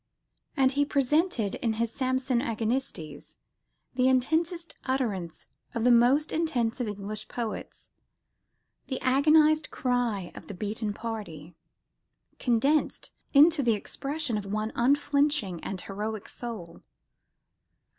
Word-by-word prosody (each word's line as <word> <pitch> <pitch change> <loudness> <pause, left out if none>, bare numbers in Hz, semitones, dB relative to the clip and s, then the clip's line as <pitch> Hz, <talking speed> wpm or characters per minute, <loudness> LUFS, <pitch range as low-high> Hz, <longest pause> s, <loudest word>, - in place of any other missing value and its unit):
And 265 -1 +4
he 285 +1 +2
presented, 280 - +1
in 225 -2 +1
his 230 +1 -1
Samson 260 -1 0
Agonistes, 220 - -3 0.6
"the 255 0 +2
intensest 320 +6 +1
utterance 215 -11 -2 0.3
of 230 - -1
the 250 - +5
most 250 +6 +4
intense 250 -8 0
of 240 - -1
English 205 +1 -5
poets 230 -3 -6 1.0
the 260 - -3
agonised 305 +3 +4
cry 240 -8 -1
of - - -11
the 200 - -7
beaten 210 +3 -3
party," 205 -8 -6 0.9
condensed 270 +5 +1 0.2
into 305 +2 +7
the 240 -4 +3
expression 275 +1 -3
of 200 - -8
one 215 +2 -2
unflinching 280 - +1
and 190 -2 -4
heroic 210 +1 -5
soul. 215 -9 -7
245 Hz, 115 wpm, -28 LUFS, 215-280 Hz, 1.0 s, into